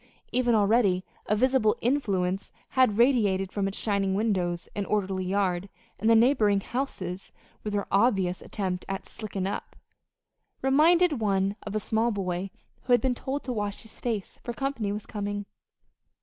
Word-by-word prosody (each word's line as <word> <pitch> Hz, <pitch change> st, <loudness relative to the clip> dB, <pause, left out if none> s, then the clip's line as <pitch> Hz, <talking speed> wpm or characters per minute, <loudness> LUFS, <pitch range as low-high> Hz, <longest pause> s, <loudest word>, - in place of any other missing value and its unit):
Even 245 Hz, -2 st, +2 dB
already 205 Hz, -3 st, +3 dB, 0.2 s
a 210 Hz, -, +2 dB
visible 255 Hz, -2 st, +3 dB
influence 195 Hz, -8 st, 0 dB, 0.2 s
had 255 Hz, -6 st, +3 dB
radiated 210 Hz, -7 st, +3 dB
from 200 Hz, -1 st, -1 dB
its 195 Hz, -, -4 dB
shining 200 Hz, -3 st, 0 dB
windows 185 Hz, -5 st, 0 dB
and 205 Hz, -1 st, -2 dB
orderly 190 Hz, -2 st, 0 dB
yard; 190 Hz, -1 st, 0 dB, 0.3 s
and 220 Hz, +3 st, +2 dB
the 230 Hz, -, +7 dB
neighboring 220 Hz, -4 st, +4 dB
houses, 195 Hz, -6 st, -4 dB, 0.3 s
with 210 Hz, -, -3 dB
their 200 Hz, -1 st, 0 dB
obvious 195 Hz, -4 st, +2 dB
attempt 185 Hz, -3 st, -3 dB
at 195 Hz, 0 st, -4 dB
"slickin' 200 Hz, -4 st, -5 dB
up," 200 Hz, -, -4 dB, 0.9 s
reminded 310 Hz, +3 st, +4 dB
one 195 Hz, -1 st, +1 dB
of 205 Hz, -, -4 dB
a -, -, +2 dB
small 220 Hz, +2 st, +1 dB
boy 190 Hz, -3 st, -2 dB, 0.4 s
who 250 Hz, -, +3 dB
has 245 Hz, -, +6 dB
been 255 Hz, +2 st, +1 dB
told 270 Hz, +3 st, -4 dB
to 255 Hz, -, -3 dB
wash 205 Hz, -2 st, -3 dB
his 220 Hz, -, -13 dB
face, 220 Hz, -5 st, -3 dB
for 240 Hz, -, -4 dB
company 255 Hz, -5 st, -2 dB
was 210 Hz, +1 st, -4 dB
coming. 205 Hz, -1 st, -4 dB
205 Hz, 160 wpm, -27 LUFS, 195-240 Hz, 0.9 s, the